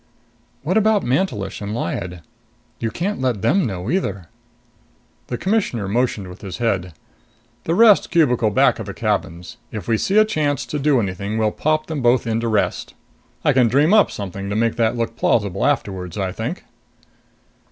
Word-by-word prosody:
"What 180 +8 +1
about 220 -1 +3
Mantelish 120 - -1
and 105 +1 -4
Lyad? 90 -4 -4 0.6
You 115 - -1
can't 175 - -3
let 125 -6 -1
them 180 - +2
know 95 +2 -4
either." 100 - -2 1.0
The 120 - -3
Commissioner 190 - -1
motioned 110 -2 -1
with 90 +1 -11
his 95 -4 -6
head. 95 -7 -1 0.7
"The 165 - 0
rest 220 -1 +6
cubicle 125 - +3
back 100 - +3
of - - -6
the - - -6
cabins. 85 +2 -3
If 105 -5 -6
we 110 -2 +1
see 195 - +1
a 215 - +7
chance 155 -9 -1
to 150 - -4
do 145 -2 +3
anything, 100 +1 -3
we'll 110 -1 +1
pop 155 +4 0
them 155 -4 -4
both 120 0 +3
into 115 0 -1
Rest. 110 -2 -1 0.5
I - - +4
can 125 -2 +4
dream 145 - +3
up 215 -2 +5
something 100 0 -6
to 100 - -2
make 115 +1 +1
that 115 0 +1
look 115 -1 -2
plausible 100 -5 +1
afterwards, 95 - -2
I 95 -2 -1
think." - - -5
115 Hz, 175 wpm, -20 LUFS, 100-150 Hz, 1.0 s, a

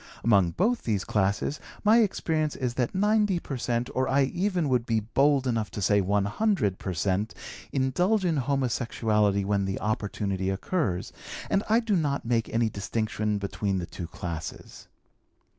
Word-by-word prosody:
Among 100 -6 +4
both 220 - +1
these 105 -4 -1
classes 100 +8 0 0.2
my 215 +3 +6
experience 160 -8 0
is 125 -3 -2
that 125 +3 -1
90 210 -1 +3
per 140 - -5
cent, 120 0 -1
or 130 0 +1
I 140 +1 +4
even 175 +3 0
would 125 -3 +2
be 115 -2 0
bold 135 +5 +2
enough 115 -4 0
to - - -1
say 100 +1 +3
100 100 - +1
per 95 - -4
cent, 100 +5 -1 0.4
indulge 175 - +1
in 165 -3 +1
homosexuality 115 -6 +1
when 100 0 0
the 95 0 -2
opportunity 100 -2 -2
occurs, 95 - -2 0.4
and 195 - +3
I 225 +2 +4
do 220 -3 0
not 145 -6 0
make 115 -1 0
any 115 0 +1
distinction 105 0 -2
between 100 0 -2
the 90 - -2
two 85 0 -7
classes. 85 -1 -7
115 Hz, 160 wpm, -27 LUFS, 100-150 Hz, 0.4 s, my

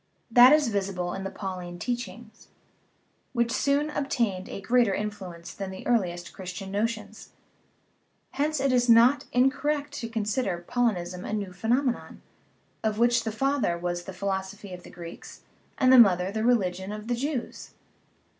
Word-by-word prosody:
That 245 +2 +9
is 300 -4 +4
visible 190 -4 -2
in 195 - -5
the - - -2
Pauline 180 -3 -6
teaching, 240 +1 -5 1.0
which 235 -1 +1
soon 285 +4 +1
obtained 235 -10 -1
a - - -6
greater 230 -1 +2
influence 190 -5 -6
than 195 -1 -5
the 190 0 -9
earliest 175 -7 0
Christian 190 +1 -7
notions. 215 0 -3 1.0
Hence 300 +1 0
it 270 0 +2
is 245 -1 +2
not 235 +5 +6
incor 265 +3 +2
rect 295 -1 0
to 230 - -5
consider 210 -5 -2
Paulinism 180 -7 -1
a - - -5
new 200 -3 -3
phenomenon, 240 +6 -1 0.6
of 215 -1 0
which 235 0 +3
the 220 - -1
father 270 -6 0
was 175 0 -3
the - - -6
philosophy 190 +1 -4
of 180 - -8
the - - -13
Greeks, 170 -1 -10 0.4
and 255 0 +5
the 255 - +9
mother 185 -4 +5
the 220 +1 -2
religion 190 -5 +1
of 210 +1 -7
the 245 - 0
Jews. 260 +1 -4
215 Hz, 155 wpm, -27 LUFS, 190-245 Hz, 1.0 s, That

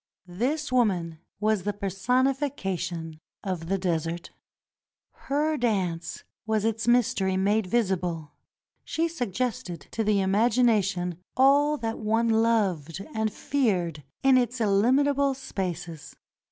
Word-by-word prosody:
This 255 - -2
woman 180 -10 +1 0.2
was 215 -1 +1
the 205 +3 -2
personification 195 - -1 0.2
of 180 -4 -3
the 195 +2 +1
desert. 170 -2 -2 1.0
Her 300 +2 +1
dance 190 -9 -1 0.2
was 220 -1 +1
its 225 0 -1
mystery 205 -6 +2
made 200 +1 +1
visible. 180 -8 -1 0.5
She 330 +1 -1
suggested 240 - -3
to 225 - -1
the 210 -1 +2
imagination 195 -4 +2 0.2
all 285 +3 +5
that 225 -3 -3
one 225 +2 +1
loved 200 -7 +1
and 220 -1 0
feared 185 - -1 0.2
in 265 -1 +6
its 245 0 -1
illimitable 265 +7 +3
spaces. 175 - -5
210 Hz, 110 wpm, -26 LUFS, 180-245 Hz, 1.0 s, in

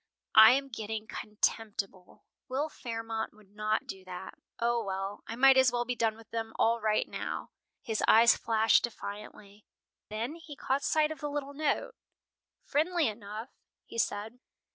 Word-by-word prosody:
"I 220 +2 +10
am 275 +1 0
getting 220 -2 -5
contemptible. 210 -3 -3 0.2
Will 275 +4 -1
Fairmont 225 -5 -5
would 210 -2 -21
not 215 +1 -1
do 190 -1 -8
that. 180 -1 -7 0.3
O, 235 0 +1
well, 195 0 -4
I 225 - -5
might 265 +2 +6
as 260 -2 +6
well 240 0 -1
be 250 - -1
done 225 -2 0
with 225 -1 -17
them 225 -1 -3
all 230 +1 +2
right 215 0 +1
now!" - - -5 0.3
His 220 -2 -2
eyes 230 +2 +7
flashed 225 -1 +3
defiantly. 210 -2 -7 0.5
Then 225 +6 -3
he 320 -3 -10
caught 275 0 -1
sight 310 +1 +2
of 310 - -6
the 295 - -3
little 285 -1 -4
note. 310 - -1 0.7
"Friendly 325 +2 +1
enough," 215 +2 -6 0.4
he 230 - -6
said. 220 +3 -2
225 Hz, 160 wpm, -30 LUFS, 215-260 Hz, 0.7 s, I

